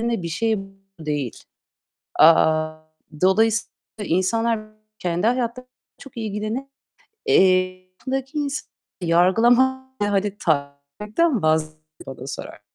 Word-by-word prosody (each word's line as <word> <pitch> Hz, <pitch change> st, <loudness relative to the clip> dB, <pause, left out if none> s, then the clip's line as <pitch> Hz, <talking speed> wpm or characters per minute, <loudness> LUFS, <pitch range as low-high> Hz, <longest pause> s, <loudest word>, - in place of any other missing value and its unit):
bir 230 Hz, -7 st, -1 dB
şey 220 Hz, +5 st, 0 dB, 0.4 s
değil. 145 Hz, -6 st, -3 dB, 0.8 s
Aaa, 155 Hz, 0 st, +5 dB, 0.4 s
dolayısıyla 220 Hz, +4 st, +3 dB, 0.4 s
insanlar 225 Hz, +6 st, +1 dB, 0.4 s
kendi 175 Hz, +3 st, 0 dB
hayatlarıyla 250 Hz, +1 st, -1 dB, 0.3 s
çok 275 Hz, -3 st, -13 dB
ilgilenir 215 Hz, +3 st, -3 dB, 0.6 s
Eee, 185 Hz, 0 st, +3 dB
yakınındaki 270 Hz, +2 st, -3 dB
insanı 285 Hz, -1 st, -3 dB, 0.3 s
yargılamaya, 235 Hz, +10 st, +4 dB, 0.2 s
hadi, 205 Hz, 0 st, 0 dB
takmaktan 160 Hz, -, -1 dB
vazgeçin 155 Hz, 0 st, +1 dB, 0.3 s
bana 130 Hz, -1 st, -8 dB
sorar 135 Hz, -, -7 dB
200 Hz, 90 wpm, -22 LUFS, 160-235 Hz, 0.8 s, Aaa